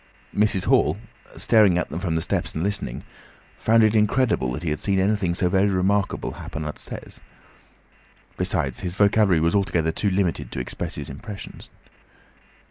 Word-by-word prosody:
Mr. 100 Hz, -3 st, +1 dB
Hall, -, -, +3 dB, 0.4 s
staring 105 Hz, -6 st, +4 dB
at 90 Hz, -, -1 dB
them 80 Hz, -, -4 dB
from 90 Hz, -3 st, -2 dB
the 80 Hz, -, 0 dB
steps -, -, -2 dB
and 80 Hz, -, -1 dB
listening, 100 Hz, -11 st, -2 dB, 0.5 s
found 115 Hz, 0 st, +3 dB
it 110 Hz, 0 st, +4 dB
incredible 105 Hz, -, +2 dB
that 75 Hz, +7 st, -5 dB
he 80 Hz, -, -1 dB
had 75 Hz, -, -2 dB
seen 100 Hz, -1 st, 0 dB
anything 95 Hz, -3 st, +1 dB
so 90 Hz, 0 st, +1 dB
very 95 Hz, +3 st, +2 dB
remarkable 95 Hz, +1 st, 0 dB
happen 80 Hz, 0 st, -7 dB
upstairs. 75 Hz, -, -8 dB, 1.1 s
Besides, 90 Hz, -8 st, -1 dB
his 90 Hz, -1 st, -4 dB
vocabulary 100 Hz, -3 st, +4 dB
was 85 Hz, +1 st, +2 dB
altogether 85 Hz, -5 st, +1 dB
too 100 Hz, +5 st, 0 dB
limited 95 Hz, -4 st, -1 dB
to -, -, -3 dB
express 65 Hz, -, -4 dB
his -, -, -6 dB
impressions. 100 Hz, -2 st, -9 dB
95 Hz, 160 wpm, -23 LUFS, 80-105 Hz, 1.1 s, staring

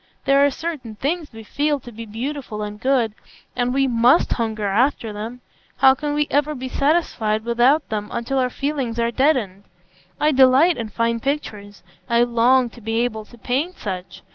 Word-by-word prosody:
There 275 Hz, 0 st, +4 dB
are 285 Hz, -, +5 dB
certain 280 Hz, -7 st, -6 dB
things 305 Hz, +7 st, -3 dB
we 225 Hz, -1 st, -11 dB
feel 290 Hz, +6 st, -1 dB
to 240 Hz, -, -11 dB
be 225 Hz, 0 st, -9 dB
beautiful 235 Hz, -1 st, -5 dB
and 210 Hz, 0 st, -7 dB
good, 250 Hz, -5 st, +1 dB, 0.4 s
and 245 Hz, 0 st, 0 dB
we 270 Hz, +1 st, +2 dB
must 245 Hz, +4 st, +3 dB
hunger 220 Hz, -3 st, -2 dB
after 225 Hz, +2 st, +1 dB
them. 225 Hz, +4 st, -7 dB, 0.4 s
How 265 Hz, 0 st, +6 dB
can 295 Hz, +2 st, -3 dB
we 295 Hz, 0 st, +2 dB
ever 295 Hz, +1 st, +1 dB
be 260 Hz, 0 st, -6 dB
satisfied 245 Hz, -8 st, 0 dB
without 245 Hz, +6 st, +3 dB
them 210 Hz, -1 st, -3 dB
until 265 Hz, +3 st, -2 dB
our 255 Hz, -1 st, +1 dB
feelings 270 Hz, -4 st, -3 dB
are 235 Hz, 0 st, 0 dB
deadened? 235 Hz, -8 st, +1 dB, 0.6 s
I 300 Hz, -, +3 dB
delight 270 Hz, +5 st, +5 dB
in 230 Hz, -2 st, -4 dB
fine 230 Hz, +2 st, -1 dB
pictures; 210 Hz, -7 st, -4 dB, 0.3 s
I 235 Hz, 0 st, +4 dB
long 245 Hz, +2 st, +3 dB
to 235 Hz, -, -14 dB
be 225 Hz, +2 st, -1 dB
able 220 Hz, -3 st, -2 dB
to 240 Hz, -, -17 dB
paint 275 Hz, -, -2 dB
such. 185 Hz, -3 st, -6 dB
245 Hz, 180 wpm, -21 LUFS, 225-280 Hz, 0.6 s, How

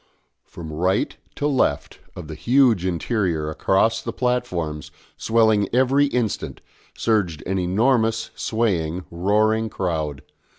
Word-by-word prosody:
From 80 Hz, -2 st, -9 dB
right 90 Hz, +5 st, 0 dB, 0.2 s
to 145 Hz, -, -3 dB
left 140 Hz, -3 st, 0 dB, 0.2 s
of -, -, -8 dB
the 80 Hz, -, -7 dB
huge 120 Hz, -, +3 dB
interior, 85 Hz, -4 st, -1 dB
across 95 Hz, +7 st, +1 dB
the 115 Hz, -, -4 dB
platforms, 110 Hz, -, -2 dB, 0.3 s
swelling 110 Hz, -3 st, +2 dB
every 135 Hz, +3 st, +3 dB
instant, 120 Hz, -6 st, -2 dB, 0.4 s
surged 95 Hz, -9 st, 0 dB
an 95 Hz, +1 st, -1 dB
enormous 115 Hz, +4 st, +1 dB
swaying, 90 Hz, -7 st, -1 dB
roaring 110 Hz, +5 st, +1 dB
crowd. 80 Hz, -8 st, -3 dB
105 Hz, 115 wpm, -22 LUFS, 85-115 Hz, 0.4 s, huge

